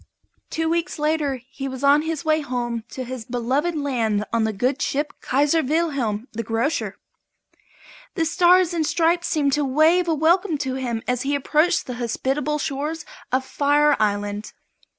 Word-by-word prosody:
Two 320 0 -1
weeks 335 +2 -1
later 300 -2 0 0.2
he 270 0 -5
was 260 0 -6
on 285 +2 +5
his 320 0 -4
way 310 0 +2
home 240 -4 -3
to 260 - -5
his 255 -1 -6
beloved 255 +8 -1
land 230 -8 0
on 230 -1 +2
the 220 - 0
good 255 +7 -1
ship 290 +2 -1
"Kaiser 290 +4 +2
Wilhelm, 275 -8 -1
the 230 - -3
Grocer." 230 +7 -1 1.2
The 330 -4 +1
Stars 355 +1 +4
and 330 -2 0
Stripes 335 +3 +1
seemed 285 -4 +1
to 295 - +2
wave 315 +6 +3
a 325 - +2
welcome 330 +2 +2
to 265 -2 -3
him 245 -4 -3
as 250 -1 0
he 285 +1 0
approached 305 +5 +2
the 250 - -5
hospitable 270 +5 -1
shores 295 +3 -3 0.3
of 260 +1 +1
Fire 290 +1 +3
Island. 205 0 -1
285 Hz, 165 wpm, -23 LUFS, 250-320 Hz, 1.2 s, on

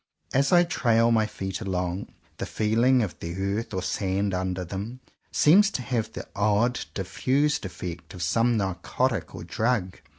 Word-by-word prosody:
As 140 +1 +3
I 175 -1 +7
trail 115 -8 +2
my 110 -2 +3
feet 95 -2 -5
along, 90 -2 -2 0.3
the - - -4
feeling 115 +4 +3
of 90 -8 -5
the 85 +1 -5 0.2
earth 115 - -7
or 95 -2 -2
sand 100 +1 -1
under 90 0 -2
them 100 +8 -6 0.3
seems 195 +7 +6
to 125 - -6
have 115 -4 -2
the - - -7
odd 105 +4 +2
diffused 140 +9 0
effect 85 -2 -7
of 90 - -4
some 115 +7 +2
narcotic 95 -4 -1
or - - -7
drug. 110 -5 -1
105 Hz, 160 wpm, -26 LUFS, 95-125 Hz, 0.3 s, I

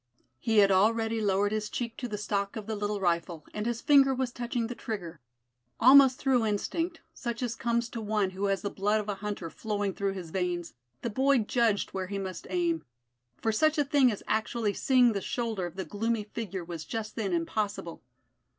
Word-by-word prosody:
He 220 - 0
had 200 -1 +6
already 225 +3 +2
lowered 205 0 +2
his 215 -1 -2
cheek 235 -2 -4
to 255 -4 -4
the 210 -3 -4
stock 200 -1 -2
of 220 -2 -5
the 220 0 -3
little 205 0 -2
rifle, 170 -3 -1
and 210 +1 -3
his 235 -1 -2
finger 275 -2 +5
was 255 -1 -1
touching 240 -1 -2
the 240 - -4
trigger. 180 -9 -6 0.6
Almost 260 +1 +8
through 255 -3 +2
instinct, 325 - -1
such 235 0 -4
as 240 -2 -1
comes 235 +1 0
to 230 - -5
one 210 -3 0
who 190 +2 -3
has 195 -2 0
the 200 - -2
blood 205 +2 +1
of 210 - -5
a - - +1
hunter 195 -4 -5
flowing 205 -2 -2
through 195 0 -1
his 180 -4 -7
veins, 175 -2 -2 0.3
the 235 - -2
boy 270 +4 +3
judged 225 -2 +1
where 190 -1 -3
he 200 +1 -4
must 190 -3 -5
aim, 170 -3 0 0.6
for 225 - +2
such 310 +8 +2
a 295 - +3
thing 275 -3 +4
as 205 - -6
actually 220 -1 0
seeing 250 -1 +4
the 200 - -2
shoulder 220 -5 -2
of 175 - -11
the 190 - -4
gloomy 225 +1 -1
figure 200 -4 -5
was 165 -2 -6
just 215 +4 -5
then 210 -4 -2
impossible. 175 +1 -2
210 Hz, 205 wpm, -29 LUFS, 195-235 Hz, 0.6 s, Almost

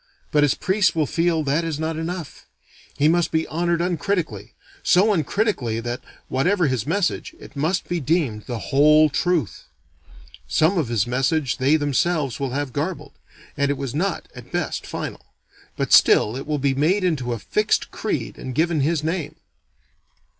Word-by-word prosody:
But 150 - +3
his 145 -2 +3
priests 190 -2 +1
will 155 -2 +2
feel 165 +2 +1
that 145 +4 +1
is 160 -3 -3
not 160 0 -2
enough: 165 0 -6 0.5
he 145 - +3
must 170 +1 +2
be 160 0 +1
honored 170 +1 0
uncritically: 175 - -2 0.3
so 205 +4 +4
uncritically 160 - 0
that, 120 +1 -4 0.3
whatever 175 +7 +1
his 130 -4 -1
message, 185 +3 -1
it - - -13
must 160 +6 -1
be 175 - -1
deemed 140 -8 0
the 120 - -3 0.2
Whole 150 +2 +6
Truth. 170 - -1 0.8
Some 160 +5 +2
of 150 - -1
his 115 -3 +1
message 135 +3 0
they 135 +4 +3
themselves 145 -1 0
will 135 -1 -1
have 135 0 -3
garbled; 150 -1 -4 0.4
and 140 -1 +1
it 140 - 0
was 135 -3 -4
not, 180 +5 -2
at - - -12
best, - - -3
final; - - -5 0.6
but - - 0
still 110 - +6
it 135 - -6
will 150 -1 0
be 140 -1 +1
made 165 +9 +2
into 145 -9 0
a - - -3
fixed 210 - 0
creed - - -3
and 130 -1 -6
given 160 +1 +1
his 155 +1 0
name. 160 -2 -2
155 Hz, 170 wpm, -22 LUFS, 135-175 Hz, 0.8 s, Whole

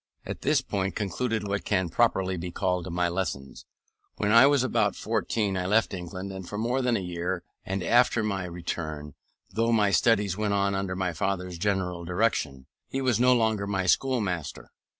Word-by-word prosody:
At - - -6
this 145 -1 +2
point 95 -7 -2
concluded 110 +2 -2
what 100 0 -2
can 95 -3 +1
properly 95 -2 +1
be 90 +1 -5
called 90 0 -1
my 90 +1 +1
lessons: 85 -7 -4 0.5
when 105 - +1
I 115 +4 +8
was 140 -3 +3
about 105 -6 +1
fourteen 110 -2 -1
I 90 -1 -1
left 110 +2 +2
England 95 +1 -6
for 105 - -5
more 120 +4 0
than 125 -2 +2
a - - -2
year; 90 0 -3 0.2
and 95 -1 -3
after 120 +2 +3
my 100 -3 -2
return, 80 -4 -5 0.4
though 115 +4 +1
my 105 -3 +3
studies 105 -4 +3
went 105 -1 0
on 100 0 +1
under 95 -1 -2
my 90 -2 -1
father's 90 0 -2
general 95 -3 -1
direction, 85 -8 -1 0.2
he 135 - -3
was 130 -4 +1
no 125 +1 +5
longer 110 -4 +1
my 95 -2 -1
schoolmaster. 90 - 0
95 Hz, 175 wpm, -27 LUFS, 90-110 Hz, 0.5 s, I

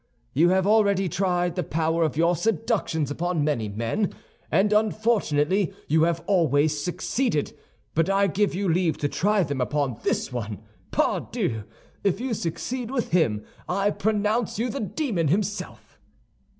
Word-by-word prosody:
You 165 +6 +4
have 190 0 +2
already 200 -2 +3
tried 180 0 0
the 180 - -1
power 165 0 0
of 150 -3 -1
your 170 +2 +3
seductions 160 -5 0
upon 170 0 -1
many 120 -8 0
men, 115 - -1 0.4
and 205 +2 +3
unfortunately 205 -5 +1
you 160 +2 +4
have 170 0 -1
always 150 -5 +2
succeeded; 180 - -1 0.4
but 165 +3 +2
I 195 0 +3
give 195 +1 +1
you 195 +1 -1
leave 170 -1 +1
to 145 - 0
try 205 +6 +2
them 140 -4 -2
upon 135 -3 -1
this 130 - -1
one. 110 -5 -5 0.3
Pardieu! 110 -2 -1 0.4
if 200 0 +1
you 255 -1 -2
succeed 230 +7 -3
with 255 -3 -2
him, 130 -12 +2 0.2
I 195 +3 +1
pronounce 210 +2 0
you 235 +2 -1
the 275 - -4
demon 210 - -1
himself." 205 +6 -3
180 Hz, 150 wpm, -25 LUFS, 150-205 Hz, 0.4 s, You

